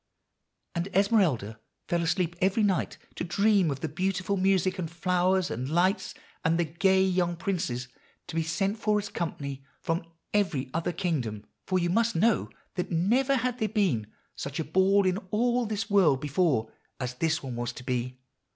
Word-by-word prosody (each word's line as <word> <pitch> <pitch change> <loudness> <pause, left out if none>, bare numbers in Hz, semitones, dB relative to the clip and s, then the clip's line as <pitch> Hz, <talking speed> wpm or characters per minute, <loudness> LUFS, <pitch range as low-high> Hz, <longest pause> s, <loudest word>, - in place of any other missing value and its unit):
And 170 +1 -2
Esmeralda 175 - +2 0.3
fell 170 0 +1
asleep 170 +1 0
every 195 +4 +3
night 195 -3 +1 0.2
to - - -4
dream 200 0 +3
of 135 -2 -3
the - - -1
beautiful 185 +4 -1
music, 190 0 +2
and 165 -3 -2
flowers, 180 +2 +1
and 125 +4 -3
lights, 180 +6 +1 0.3
and 165 +1 +2
the 170 - +2
gay 190 +4 +3
young 180 -2 +1
princes 165 -9 -2 0.4
to - - -8
be 165 - +1
sent 195 +6 -1
for 210 -1 +2
as 205 0 -3
company 140 -6 -4 0.2
from 165 +1 -1 0.3
every 175 -11 0
other 165 +2 0
kingdom; 150 - -2 0.2
for 185 - +2
you 175 -1 +1
must 230 +3 +2
know 220 +7 +2 0.2
that 180 - -3
never 240 +11 +2
had 250 0 -1
there 220 -2 0
been 185 - +1 0.3
such 140 +2 -5
a - - +1
ball 195 +3 +3
in 185 0 +2
all 240 +3 +1
this 215 +1 -2
world 190 -10 +4
before 145 -6 +1 0.3
as 125 -1 -3
this 160 +5 0
one 130 -3 -5
was 120 0 -2
to 130 - -9
be. 125 0 -2
180 Hz, 175 wpm, -28 LUFS, 150-200 Hz, 0.4 s, world